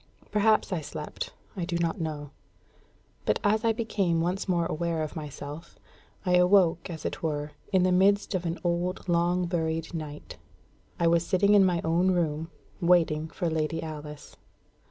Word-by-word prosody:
Perhaps 210 -1 +3
I 170 - -1
slept 150 0 -6 0.2
I 185 - -3
do 170 0 -1
not 170 +2 -1
know; 150 -3 -4 0.9
but - - +1
as 215 +1 +2
I 230 - +4
became 205 -7 0
once 180 +4 -1
more 170 -2 +2
aware 165 0 -1
of 155 - -6
myself, 150 0 -8 0.5
I 180 -1 +4
awoke, 180 -2 +4
as 160 -3 -7
it - - -3
were, 150 -2 -2 0.2
in 190 -2 +4
the 185 - +3
midst 200 +3 +3
of 185 -2 -1
an 165 +2 -2
old 175 +2 -1
long 175 +1 +2
buried 165 -2 -2
night. 150 -2 -7 0.6
I 170 - +2
was 170 0 +4
sitting 200 +2 +3
in 205 -1 +7
my 175 -3 +2
own 170 +3 +2
room, 165 -3 0 0.3
waiting 165 -3 +3
for 170 +2 -3
Lady 160 0 -1
Alice. 150 -2 -8
170 Hz, 165 wpm, -28 LUFS, 160-185 Hz, 0.9 s, in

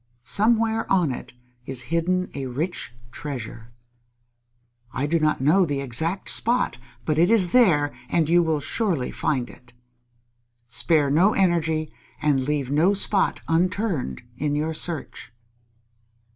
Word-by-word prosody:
Somewhere 225 - +2
on 180 -7 +3
it 125 - -7 0.3
is 130 -2 -2
hidden 185 +2 0
a 135 -2 -4
rich 150 +5 -3 0.2
treasure. 120 -5 -7 1.2
I 135 - -2
do 165 +3 +1
not 155 -3 +1
know 160 +8 +4
the 145 -5 -1
exact 160 +8 -2
spot, 240 - 0 0.3
but 155 0 0
it 175 +3 +4
is 205 -6 +3
there, 165 - +4 0.2
and 165 -3 +1
you 175 +2 +4
will 160 -3 0
surely 175 - -1
find 130 -4 -1
it. 125 -1 -17 0.9
Spare 145 +3 +2
no 180 +8 +4
energy 160 -4 +1 0.3
and 145 -3 +2
leave 145 -3 -1
no 170 +8 +3
spot 200 0 +1
unturned 175 - -1 0.2
in 145 0 0
your 155 +2 -1
search." 160 -4 -4
160 Hz, 130 wpm, -24 LUFS, 140-185 Hz, 1.2 s, know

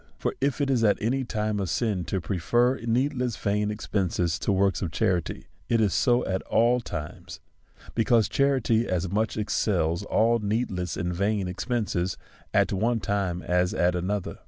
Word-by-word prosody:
For - - -2
if 140 0 0
it 140 -1 +1
is 120 -4 +2
at 105 -2 +4
any 130 +5 0
time 105 -3 -2
a 95 - -1
sin 100 -1 -1
to 95 +5 -1
prefer 120 +9 +1
needless 125 0 0
vain 105 +1 0
expence 90 -5 -1
to - - 0
works 95 0 +2
of 90 - -1
charity, 90 -2 -1 0.2
it 115 - +3
is 105 -4 +2
so 120 -1 +2
at 95 0 -1
all 120 +2 +3
times; 75 -9 -7 0.5
because 115 -1 +3
charity 130 -5 +2
as 90 -1 -1
much 110 +2 0
excels 95 -5 0
all 115 +3 +2
needless 100 -5 -2
and 90 -1 -2
vain 100 +1 0
expences 95 - -2 0.3
at - - +2
one 115 +4 +1
time 95 -4 -2
as 90 0 +1
at 90 +1 +2
another. 95 +3 -3
105 Hz, 165 wpm, -26 LUFS, 90-115 Hz, 0.5 s, at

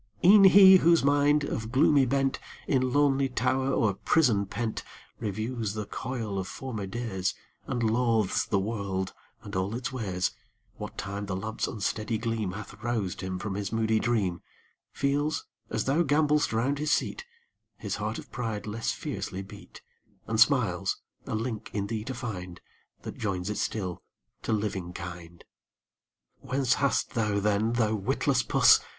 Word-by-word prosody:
E'en 195 +2 +9
he 190 0 +9
whose 170 -3 +4
mind, 145 +1 +3
of 110 -5 -3
gloomy 135 0 +4
bent, 135 +1 +1 0.3
In 130 -2 +2
lonely 140 -1 +3
tower 130 +2 0
or 110 -6 +2
prison 105 -3 +2
pent, 110 +3 -3 0.4
Reviews 110 0 -3
the 105 -1 -3
coil 115 -4 -4
of 95 - -4
former 110 -6 -5
days, 95 -4 -2 0.3
And 120 -1 -1
loathes 115 -2 +1
the 100 - +1
world 95 -2 -2 0.3
and 100 -3 -8
all 95 +4 -1
its 125 +1 -3
ways, 95 -8 -1 0.5
What 105 - -7
time 100 0 -4
the 95 - -2
lamp's 110 +4 -3
unsteady 110 +1 -2
gleam 110 -4 -2
Hath 100 0 -8
roused 105 -5 -2
him 95 -1 -3
from 100 +1 -4
his 100 -1 -3
moody 110 -1 +1
dream, 100 -8 0 0.5
Feels, 145 +2 0 0.2
as - - -1
thou 140 +6 +2
gambol'st 150 -1 +2
round 130 +6 0
his 150 0 -1
seat, - - 0 0.5
His - - -4
heart - - -3
of - - -10
pride 115 -4 -3
less 110 +2 -2
fiercely 95 +1 -5
beat, 95 - -13 0.4
And 110 -1 -1
smiles, 110 -7 +3 0.3
a - - -2
link 110 -1 -3
in 100 -1 -1
thee 110 0 -3
to 130 - -4
find 95 -8 -6 0.4
That - - -7
joins 95 -1 -2
it - - -3
still 95 -5 -3 0.4
to - - -3
living 100 -5 -2
kind. 85 -1 -8 1.0
Whence 130 -1 +1
hast 140 -1 +1
thou 105 -3 0
then, 105 +2 +1
thou 110 -2 +1
witless 100 -3 +1
puss! - - +6
110 Hz, 155 wpm, -28 LUFS, 100-130 Hz, 1.0 s, E'en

